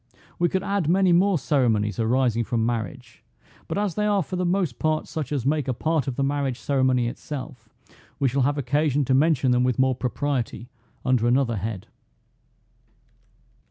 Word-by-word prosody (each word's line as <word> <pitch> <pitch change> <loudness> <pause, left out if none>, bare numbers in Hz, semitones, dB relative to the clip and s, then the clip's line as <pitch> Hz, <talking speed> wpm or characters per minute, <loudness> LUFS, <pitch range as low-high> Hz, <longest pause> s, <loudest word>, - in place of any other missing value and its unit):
We 175 0 +3
could 190 +2 -1
add 200 -6 -1
many 185 +1 +4
more 185 +2 +4
ceremonies 115 - +1
arising 115 0 +1
from 115 -1 -1
marriage, 115 -2 -4 0.4
but - - -3
as 205 -3 0
they 210 +3 0
are 200 -3 +2
for 185 - -6
the 180 0 0
most 175 -9 -1
part 155 0 0
such 150 -4 -5
as 135 -5 -2
make 150 -1 0
a 130 - -1
part 155 +1 0
of 130 - -2
the 140 - -1
marriage 135 -2 -1
ceremony 130 -3 +1
itself, 125 -3 -7 0.5
we 140 - +2
shall 135 +2 0
have 145 +3 +1
occasion 145 +1 +1
to 130 - +1
mention 135 -2 +3
them 125 0 +3
with 125 -2 +1
more 130 0 +3
propriety 125 -1 -3 0.4
under 125 -2 +2
another 120 -2 +2
head. 100 -1 -4
135 Hz, 175 wpm, -24 LUFS, 120-155 Hz, 0.5 s, many